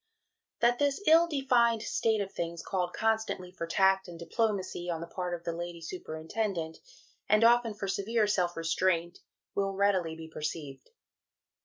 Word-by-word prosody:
" - - -59
That 240 +1 +3
this 285 -1 +2
ill 330 +2 +6
defined 245 -7 +2
state 220 -2 +1
of 195 -1 -4
things 170 -1 -4
called 180 -2 -1
constantly 220 -5 -1
for 170 -2 -5
tact 190 +2 +3
and 175 -1 -9
diplomacy 185 0 -2
on 165 -2 -1
the 170 - -5
part 180 0 -3
of 170 - -11
the 170 - -2
Lady 170 0 -5
Superintendent, 165 +1 -4 0.5
and 215 +1 +5
often 235 -1 +4
for 200 - -4
severe 210 +3 +1
self 180 -5 0
restraint, 170 +1 0 0.3
will 195 -1 -1
readily 190 -5 +1
be 160 0 -9
perceived. 150 -3 -6
190 Hz, 160 wpm, -30 LUFS, 170-220 Hz, 0.5 s, ill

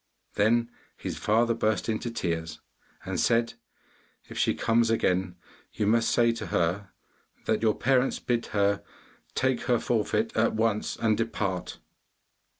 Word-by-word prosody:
Then 115 +3 +2 0.3
his - - -5
father 115 +2 +2
burst 110 -1 0
into 115 +1 -2
tears 85 -7 -3 0.5
and - - -2
said, 115 0 +2 0.7
'If - - -10
she - - +1
comes 115 0 +2
again 90 -5 +1 0.4
you 105 - -1
must 115 +2 +3
say 115 -1 +3
to 115 - -5
her 90 +4 0 0.6
that 110 -1 +1
your 110 -2 +2
parents 135 0 +2
bid 120 -1 -1
her 100 -1 +1 0.5
take 130 -1 +1
her 120 - +3
forfeit 110 -1 0
at 110 0 +2
once, 110 -1 0
and 110 -2 +1
depart. 100 -5 -2
110 Hz, 140 wpm, -27 LUFS, 100-115 Hz, 0.7 s, must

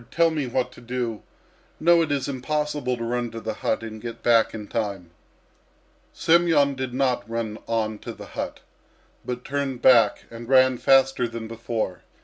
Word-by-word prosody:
Tell 165 0 +3
me 150 -4 -2
what 125 0 -1
to - - -14
do!... 120 -2 -3 0.6
No, 170 +1 +5
it 160 -3 -1
is 140 -2 0
impossible 145 -1 -2
to 115 - -5
run 120 +1 -1
to 115 0 -7
the 110 - -4
hut - - -2
and 110 -1 -7
get 115 -1 -7
back 115 -2 +4
in 105 -2 -7
time." 100 -7 -3 1.0
Semyon 165 -4 +3
did 130 -1 -4
not 125 -4 0
run 115 -2 -3
on 110 -2 -1
to - - -7
the - - -10
hut, - - -5 0.6
but 125 0 -5
turned 135 -3 -3
back 115 -5 +5
and 115 +1 -9
ran 130 -2 +5
faster 135 -2 +4
than 115 -1 -6
before. 115 -4 -4
125 Hz, 170 wpm, -24 LUFS, 115-135 Hz, 1.0 s, No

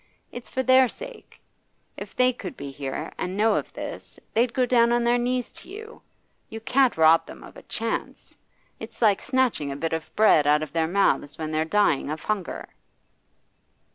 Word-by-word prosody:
It's 245 -2 -9
for 260 - -2
their 260 -1 +5
sake. - - -11 0.6
If - - -9
they 255 0 +3
could 195 -7 -8
be 140 -1 -7
here 135 +3 -5
and 185 +1 -3
know 220 +2 +3
of - - -2
this, - - -7
they'd 235 +2 +2
go 255 +1 +1
down 235 -1 +3
on 240 0 +2
their 240 +1 +3
knees 250 0 -1
to - - -12
you. 440 +4 -10 0.5
You 225 - -7
can't 255 +1 +2
rob 160 +1 +5
them - - -11
of - - -13
a - - -11
chance! - - -4 0.4
It's - - -10
like 210 -4 +3
snatching 255 - 0
a - - -4
bit 165 +3 -3
of 160 -1 -4
bread 185 -9 +5
out 150 +1 +4
of 150 - -8
their 165 -1 +1
mouths 175 -5 +1
when 155 -1 -4
they're 155 0 0
dying 160 -6 +1
of 155 0 -5
hunger. 205 -5 -3
215 Hz, 190 wpm, -25 LUFS, 160-250 Hz, 0.6 s, their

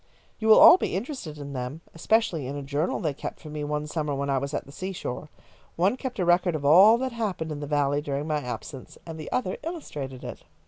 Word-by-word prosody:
You 220 - -2
will 220 - +8
all 360 - +9
be - - -2
interested 195 - -5
in 140 -1 -7
them, 130 +4 -5
especially 170 - +1
in 140 - -5
a 145 - -5
journal 145 +5 -1
they 155 -4 -1
kept - - -7
for 155 - -10
me 150 -1 -4
one 150 0 -2
summer 150 -2 -2
when 140 0 -2
I 135 - +2
was 140 +1 -4
at - - -3
the 140 - -13
seashore. 170 -4 -5 0.5
One 190 +7 +2
kept 260 -1 -6
a 185 - 0
record 175 0 +3
of 145 -2 -4
all 190 +10 +8
that 260 +1 -2
happened 200 -9 -3
in 150 - -4
the 145 - -5
Valley 145 0 +1
during 145 0 -3
my 155 -1 0
absence, 130 +1 -7
and 160 -1 -8
the 155 - -7
other 190 -7 -1
illustrated 150 - -6
it." - - -8
155 Hz, 235 wpm, -26 LUFS, 140-190 Hz, 0.5 s, all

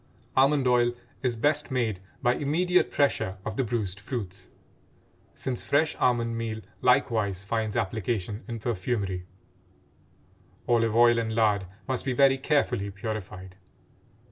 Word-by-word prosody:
Almond 135 0 +4
oil 120 -1 +3 0.3
is 125 -2 0
best 145 +5 +1
made 115 -7 -1 0.2
by 120 - +4
immediate 175 +7 +2
pressure 135 -9 +1
of - - -3
the 135 - +1
bruised 105 -5 -3
fruits, 100 -5 -6 0.9
since 130 -2 -4
fresh 150 +2 +2
almond 120 -2 +1
meal 115 -1 -3 0.2
likewise 110 -7 +2
finds 110 0 -2
application 110 0 -2
in 115 -2 -4
perfumery; 100 -4 -2 1.4
olive 115 -2 +2
oil 120 0 +6
and 110 -1 -2
lard 105 -4 +2 0.2
must 130 -2 -1
be 135 - -1
very 135 +1 +4
carefully 135 -8 +1
purified. 100 -3 -6
115 Hz, 125 wpm, -27 LUFS, 100-130 Hz, 1.4 s, oil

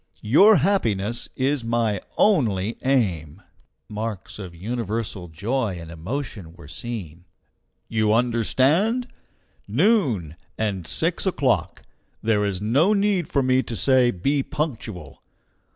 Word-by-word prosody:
Your 195 - +6
happiness 120 - 0
is 135 0 0
my 115 -4 0 0.2
only 115 - +2
aim." 95 - 0 0.4
(Marks 105 -2 -5
of 90 -4 -8
universal 110 -1 -4
joy 100 - -2
and 85 0 -9
emotion.) 95 - -6 1.3
"You 110 -1 +1
understand? 135 - +2 0.6
Noon, 120 - +1 0.2
and 100 -6 -2
six - - 0
o'clock! - - 0 0.4
There 110 -2 +1
is 100 -2 -2
no 135 - +3
need 200 -4 +1
for 140 - +1
me 130 0 +3
to 120 - -6
say 130 +1 +4
be 135 +8 0
punctual! 115 - -5
115 Hz, 105 wpm, -23 LUFS, 100-140 Hz, 1.3 s, Your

